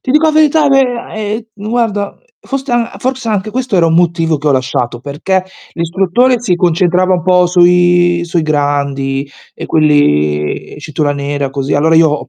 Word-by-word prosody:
Ti 255 - -3
dico 305 +2 +3
la - - +3
verità 310 0 +3
ehm 260 -4 +1
ehm 215 0 -5
guarda, 220 -4 -1 0.2
forse 270 0 -5
a 240 -1 -1
forse 260 -2 -3
anche 210 0 -1
questo 250 -1 -3
era 175 -3 +3
un 165 - +1
motivo 165 -2 +1
che 150 - -6
ho 145 - +4
lasciato, 125 -2 -2
perché 165 +8 -2 0.3
l'istruttore 195 +9 +1
si 205 -7 0
concentrava 180 +1 +1
un 175 -3 -3
po' 180 -1 +4
sui 175 -1 +3
sui 170 -1 -1
grandi 140 -2 -1 0.2
e - - -8
quelli 75 - +1
cintura 150 -1 -2
nera 140 -1 -3
così, 135 +1 -2
allora 160 +3 +3
io 155 -2 +2
175 Hz, 165 wpm, -13 LUFS, 145-220 Hz, 0.3 s, ho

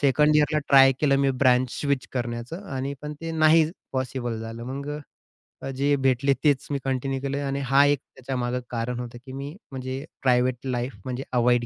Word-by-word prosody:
2nd 150 +2 +4
इयरला 150 +1 +3
try 135 -1 +8
केलं 140 -2 +4
मी 140 -1 +3
branch 125 -1 +4
switch 140 -3 0
करण्याचं 120 - -4
आणि 135 +2 -2
पण 150 0 -5
ते 165 0 -4
नाही 155 0 +5 0.2
पॉसिबल 130 -3 -2
झालं. 115 +1 -7
मग 140 +3 -5 0.7
अ, - - -5
जे 140 +2 +2
भेटले 135 0 +2
तेच 145 -3 +2
मी 140 - 0
कंटिन्यू 135 0 -1
केलं 140 +1 -2
आणि 140 0 -1
हा 140 +1 +7
एक 145 -2 +3 0.2
त्याच्यामागे 125 -1 -2
कारण 120 +1 -3
होतं 120 -1 -6
की 130 - -9
मी 140 +4 -6 0.2
म्हणजे 130 +1 -5 0.2
प्रायव्हेट 125 -1 +3
लाईफ 125 -1 -2
म्हणजे 130 +1 -3
अव्हॉइड 120 0 +3
135 Hz, 180 wpm, -25 LUFS, 125-140 Hz, 0.7 s, try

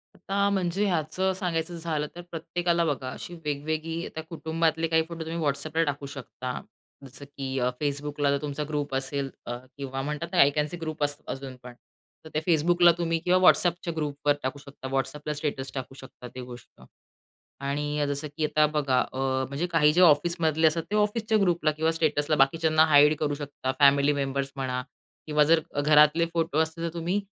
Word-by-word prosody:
आता 200 +2 0
म्हणजे 190 +1 0
ह्याचं 180 +2 0
सांगायचं 175 -2 -2
झालं 155 -3 -2
तर 175 - -7
प्रत्येकाला 170 +1 0
बघा 135 -4 -2
अशी 175 - -8
वेगवेगळी 155 +3 -2
आता 160 - -6
कुटुंबातले 165 0 0
काही 160 0 +3
फोटो 170 -1 -7
तुम्ही 165 +1 -4
WhatsAppला 155 +3 0
टाकू 140 0 -3
शकता. 130 -2 -6 0.4
जसं, 140 +2 -7
की 135 -1 -5
अ, 125 0 +2
Facebookला 145 0 -1
जर 140 - +2
तुमचा 150 0 -3
ग्रुप 145 -2 -2
असेल 135 +1 -2 0.2
अ, 120 - -4 0.2
किंवा 135 -1 -4
म्हणतात 150 +4 -3
ते - - -2
आय 140 - +7
कॅन 150 0 +1
सी 175 - -7
ग्रुप 155 -2 -3
असतात 145 0 -3
अजूनपण, 130 -2 -9 0.5
तर 160 - -9
त्या 155 - 0
Facebookला 175 +2 +5
तुम्ही 165 -1 0
किंवा 180 +2 +2
व्हॉट्सअपच्या 175 -2 +3
ग्रुपवर 145 -1 0
टाकू 130 +2 -3
शकता, 140 -2 -10
WhatsAppला 150 +3 -2
स्टेटस 145 -3 -3
टाकू 135 0 -6
शकता, 130 -1 -11
ते 130 - -5
गोष्ट 125 -1 -12 0.8
आणि 145 +1 -1
जसं 145 +2 -2
की 155 - +1
आता 155 0 +3
बघा 140 -4 +1
अ, 130 - -6 0.3
म्हणजे 145 +6 -2
काही 150 -2 +4
जे 180 - +4
ऑफिसमधले 160 -1 +4
असतात 160 +1 0
ते 210 - +1
ऑफिसच्या 215 +1 +1
ग्रुपला 170 -5 +2
किंवा 160 +2 0
स्टेटसला 155 -2 +1
बाकीच्यांना 155 +3 +4
हाईड 150 0 +6
करू 145 -1 0
शकता, 145 -2 -4
फॅमिली 140 +1 +5
मेंबर्स 140 -1 -2
म्हणा 130 -1 -2 0.5
किंवा 150 -1 +4
जर 165 +2 +4 0.2
घरातले 150 +2 +5
फोटो 165 -2 0
असते 160 +1 -1
तर 170 0 -3
तुम्ही 175 +4 -1
150 Hz, 180 wpm, -27 LUFS, 140-165 Hz, 0.8 s, आय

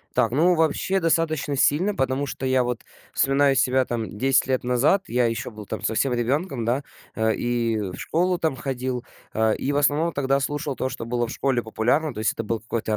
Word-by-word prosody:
Так, 115 - +3
ну 170 +7 +4
вообще 165 +4 +1
достаточно 160 -4 +1
сильно, 170 +10 +2
потому 135 -3 0
что 135 - -5
я 130 -1 +2
вот 120 -1 -3 0.3
вспоминаю 135 0 +3
себя 130 0 +3
там 115 -3 -4
10 135 +2 +3
лет 130 -1 0
назад, 130 +11 +2
я 120 +1 +2
еще 115 +1 -2
был 105 -2 -10
там - - -5
совсем 125 +4 +1
ребенком, 125 +2 -1
да. 130 +4 0 0.3
А, 110 0 +1
и 120 0 0
в 95 -4 -4
школу 180 +2 0
там 160 -4 0
ходил, 130 -1 -3 0.3
а, 110 0 +2
и 140 - -2
в 145 - -1
основном 145 +4 +2
тогда 135 -1 +1
слушал 145 0 -2
то, 130 - -1
что 115 - -6
было 120 0 -1
в - - -8
школе 130 -3 0
популярно, 120 +8 0
то 115 - -10
есть 110 - +2
это 115 - -4
был 110 0 -2
какой-то 110 -1 -2
130 Hz, 210 wpm, -24 LUFS, 120-145 Hz, 0.3 s, ну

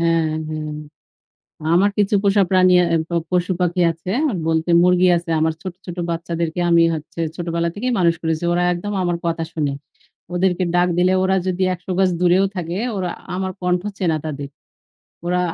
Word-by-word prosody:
হ্যাঁ, 165 -1 +2 0.2
হ্যাঁ। 155 -1 -4 1.0
আমার 200 +3 +4
কিছু 205 0 +2
পোষা 200 0 +4
প্রাণী, 185 -1 +5
এহ 170 0 0
পশু-পাখি 180 0 0
আছে। 165 +3 -8 0.4
বলতে 160 +1 0
মুরগি 180 0 +4
আছে। 170 0 -4
আমার 160 0 +2
ছোট, 185 -2 -5
ছোট 175 -1 -6
বাচ্চাদেরকে 170 0 -3
আমি 170 0 +5
হচ্ছে 155 +2 -7 0.2
ছোটবেলা 170 -1 -1
থেকেই 250 +4 -2
মানুষ 170 -2 +3
করেছি। 160 0 -1
ওরা 175 +1 +1
একদম 190 +4 -4
আমার 175 -1 0
কথা 165 0 -1
শোনে। 150 -3 -1 0.6
ওদেরকে 185 0 +1
ডাক 175 0 +3
দিলে 180 +1 +3
ওরা 190 0 +2
যদি 185 0 -1
১০০ 180 +1 -6
গজ 190 -1 +4
দূরেও 180 +2 +4
থাকে 175 +1 -3 0.2
ওরা 180 -2 -2 0.2
আমার 190 0 -2
কন্ঠ 180 0 +1 0.2
চেনা 165 -4 +1
তাদের। 140 -2 -5 0.8
ওরা 180 0 +1
175 Hz, 160 wpm, -20 LUFS, 165-185 Hz, 1.0 s, প্রাণী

